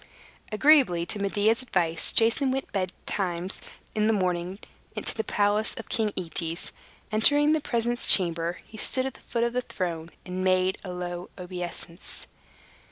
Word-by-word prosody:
Agreeably 215 - +4
to 205 - -5
Medea's 205 +4 +1
advice, 170 -9 +2
Jason 230 +4 +3
went 270 +1 -3
betimes 185 -1 -2 0.3
in 215 0 +1
the 225 - +3
morning 180 -1 -2 0.4
to - - -1
the 220 - -2
palace 205 +1 0
of 225 - -9
King 220 -2 0
Aetes. 165 -1 +1 0.4
Entering 290 +8 +6
the 315 -1 +1
presence 240 -1 -1
chamber, 170 -2 +4
he 220 - -13
stood 260 +4 -1
at 265 - -4
the - - -17
foot 235 -1 -3
of 235 0 -1
the 250 - 0
throne, 170 -7 -5 0.2
and 185 0 -4
made 185 +1 +1
a 185 - -7
low 180 0 -6
obeisance. 180 -1 -6
195 Hz, 155 wpm, -26 LUFS, 175-230 Hz, 0.4 s, Entering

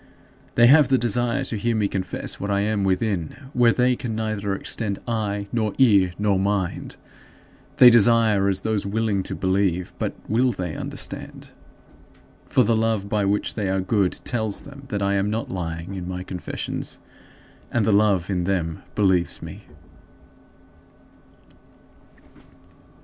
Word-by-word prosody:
They 120 - +6
have 145 +3 +7
the 135 0 +3
desire 120 +3 0
to 115 - -1
hear 115 +3 0
me 105 -2 +1
confess 95 -2 -4
what 100 - -4
I 100 0 +1
am 105 -1 0
within, 95 - -2
where 120 -1 +4
they 125 +1 +2
can 115 -2 -5
neither 110 -3 -2
extend 100 0 -2
eye 105 -3 -2
nor 110 -3 -1
ear 100 -9 +4
nor 100 -2 +1
mind. 100 -2 -2 0.8
They 125 -4 +9
desire 115 -3 +4
as 95 -1 0
those 110 -1 -1
willing 105 0 -1
to - - -5
believe 95 -2 0
but - - -2
will 125 +3 +2
they 90 -5 -4
understand? - - -4 1.0
For - - +4
the 115 - +2
love 110 -3 0
by 105 -1 +1
which 100 +1 0
they 105 -3 -2
are 95 0 0
good 95 0 +1
tells 110 -4 -2
them 140 -1 -12
that 105 -5 -3
I 100 0 +1
am 100 +1 0
not 110 +2 -3
lying 85 0 -5
in 90 -2 -6
my 90 0 -5
confessions, 90 -1 -5 0.7
and 115 -4 +1
the 110 - +2
love 100 -3 +3
in 90 -2 -1
them 85 -4 -2
believes 95 -4 +1
me. - - -9
105 Hz, 150 wpm, -23 LUFS, 95-115 Hz, 1.0 s, They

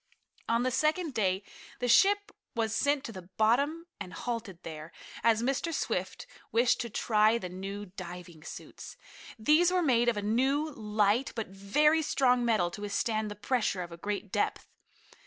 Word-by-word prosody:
On 230 +1 +2
the 255 - +1
second 310 +4 +1
day 190 -3 0 0.3
the 245 - -2
ship 405 - +4 0.2
was 225 -1 0
sent 285 +5 +1
to - - -6
the 190 -4 -8 0.2
bottom 280 +10 +2
and 185 -3 -7
halted 225 -2 -4
there, 155 0 -8 0.3
as 230 0 +3
Mr. 275 +6 0
Swift - - -2 0.3
wished 235 +2 +3
to 235 - -4
try 215 +1 +3
the 185 -6 -5
new 195 +3 -6
diving 180 -3 -9
suits. - - -9 0.4
These 305 +10 +4
were 365 -1 +2
made 240 -5 +3
of 230 - -1
a 205 - -2
new, 270 +8 +1
light, 215 0 +1
but 225 -5 -3
very 295 +12 +2
strong 250 -4 +2
metal 215 -7 +2
to 205 - -8
withstand 215 +1 -1
the 210 - -6
pressure 210 -3 0
of 175 - -10
a - - -7
great 205 +2 -4
depth. 205 - -1
225 Hz, 170 wpm, -30 LUFS, 200-265 Hz, 0.4 s, ship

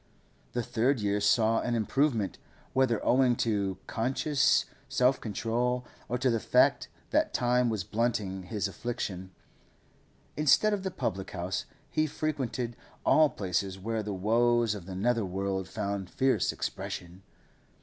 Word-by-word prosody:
The 120 - -1
third 125 +4 +1
year 105 0 0
saw 110 +2 +3
an 120 - -1
improvement, 115 - 0 0.3
whether 130 -4 +2
owing 125 -1 +4
to 100 -4 0
conscious 130 +4 +2 0.2
self 130 +1 +2
control 120 +3 -1 0.2
or 125 - 0
to 130 0 +2
the 115 - +1
fact - - +3 0.2
that - - +2
time 125 0 +2
was 110 -5 -1
blunting 105 -3 -1
his 100 +3 -2
affliction. 95 -2 -4 1.1
Instead 155 +8 +4
of 205 - -1
the 190 - -2
public 100 - -3
house, 90 0 -3 0.3
he 155 0 +1
frequented 130 -6 -3 0.3
all 155 -1 +6
places 95 -2 -2
where 110 +3 -2
the 105 0 -4
woes 115 +3 +2
of 100 -4 -8
the 95 - -6
nether 115 +3 +1
world 95 0 -2
found 100 -3 -3
fierce 130 +5 +2
expression. 90 +1 -5
115 Hz, 140 wpm, -29 LUFS, 100-125 Hz, 1.1 s, all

